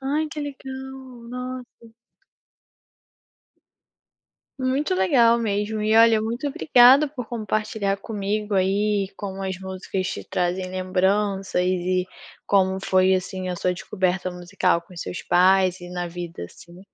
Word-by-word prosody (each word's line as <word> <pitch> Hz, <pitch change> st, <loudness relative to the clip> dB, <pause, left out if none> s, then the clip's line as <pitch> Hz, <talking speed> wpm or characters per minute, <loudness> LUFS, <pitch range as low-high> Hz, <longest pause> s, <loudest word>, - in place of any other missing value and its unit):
Ai 290 Hz, +4 st, 0 dB
que 300 Hz, -, -5 dB
legal, 265 Hz, -3 st, -8 dB
nossa. 250 Hz, -2 st, -8 dB, 2.6 s
Muito 260 Hz, -3 st, 0 dB
legal 230 Hz, +5 st, +4 dB
mesmo 210 Hz, -1 st, -1 dB
e 215 Hz, +1 st, +2 dB
olha, 225 Hz, -1 st, +6 dB
muito 235 Hz, +6 st, -2 dB
obrigada 270 Hz, +1 st, +6 dB
por 255 Hz, -5 st, -7 dB
compartilhar 215 Hz, -3 st, -2 dB
comigo 210 Hz, 0 st, -3 dB
aí 195 Hz, +1 st, +1 dB
como 195 Hz, -1 st, -6 dB
as 190 Hz, -1 st, -3 dB
músicas 190 Hz, 0 st, -4 dB
te -, -, -5 dB
trazem 185 Hz, +1 st, -2 dB
lembranças 190 Hz, +1 st, 0 dB
e 180 Hz, 0 st, 0 dB, 0.4 s
como 190 Hz, -1 st, +2 dB
foi, 185 Hz, 0 st, +3 dB
assim, 185 Hz, 0 st, -3 dB
a 180 Hz, -, -3 dB
sua 180 Hz, +1 st, 0 dB
descoberta 185 Hz, 0 st, -1 dB
musical 180 Hz, 0 st, 0 dB
com 175 Hz, +2 st, -17 dB
os 170 Hz, -, -7 dB
seus 180 Hz, -, -6 dB
pais 185 Hz, 0 st, +3 dB
e 175 Hz, -, -9 dB
na 175 Hz, -1 st, -4 dB
vida, 170 Hz, -, -7 dB
assim. 175 Hz, -, -14 dB
195 Hz, 130 wpm, -23 LUFS, 185-230 Hz, 2.6 s, olha